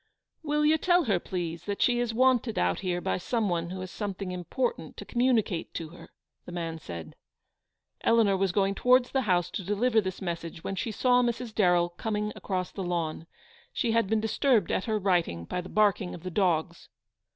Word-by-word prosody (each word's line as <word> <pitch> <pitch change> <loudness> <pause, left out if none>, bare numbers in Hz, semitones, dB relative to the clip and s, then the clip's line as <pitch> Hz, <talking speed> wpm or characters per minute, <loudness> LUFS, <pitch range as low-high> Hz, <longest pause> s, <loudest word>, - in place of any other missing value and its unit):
" - - -61
Will 300 0 +1
you 315 +1 +4
tell 355 +1 +3
her, 200 - +1
please, 170 -2 -4
that 205 -1 -3
she 240 -1 +3
is 240 -1 0
wanted 245 -1 +2
out 90 0 +1
here 180 -2 -1
by - - -1
some 220 +2 -1
one 170 -1 -1
who 185 +1 -5
has 185 0 -6
something 200 -3 -4
im 180 -1 -5
portant 485 - -2
to - - -7
communicate 240 -8 0
to 165 -2 -4
her," 170 +1 -13 0.4
the - - -7
man 165 -2 -4
said. 85 - -8 0.9
Eleanor 225 -4 +4
was 190 -1 +1
going 195 +1 +1
towards 250 +3 +3
the 265 - +1
house 175 -1 +2
to 195 - -4
deliver 220 +4 +2
this 190 -2 -5
message, 170 -3 -5
when 195 - -3
she 225 - -2
saw 250 +3 +3
Mrs. 240 -1 -2
Darrell 175 -4 +3
coming 210 +3 -3
across 185 -2 -3
the 195 - -6
lawn. 165 -2 -2 0.5
She 240 -5 0
had 230 -2 +2
been 220 0 +2
disturbed 220 - +2
at - - 0
her 220 -2 0
writing 175 - 0
by 180 - -3
the 180 - -10
barking 205 -3 +2
of 170 - -12
the 185 - -5
dogs. 170 -3 0
195 Hz, 205 wpm, -28 LUFS, 175-230 Hz, 0.9 s, you